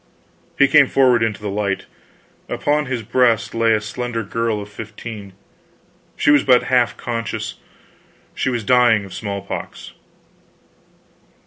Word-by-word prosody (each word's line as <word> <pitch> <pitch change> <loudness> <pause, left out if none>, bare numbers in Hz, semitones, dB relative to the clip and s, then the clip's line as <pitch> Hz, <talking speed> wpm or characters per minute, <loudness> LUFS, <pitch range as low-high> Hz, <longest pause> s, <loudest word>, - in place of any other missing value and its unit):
He 140 - +5
came 140 -1 +6
forward 130 -3 +3
into 105 -2 -1
the - - -3
light; 100 -1 -2 0.6
upon 150 0 0
his 125 -3 -3
breast 120 0 +1
lay 115 0 +2
a 110 - +2
slender 115 +2 -4
girl 115 +1 -2
of 100 - -7
fifteen. 105 -1 -9 0.8
She - - +3
was 145 -2 +5
but 125 -2 +4
half 125 -2 +1
conscious; 115 -2 -4 0.8
she - - -1
was 120 -3 -2
dying 120 -3 +4
of 95 - -11
smallpox. 100 -2 -6
115 Hz, 130 wpm, -20 LUFS, 105-125 Hz, 0.8 s, came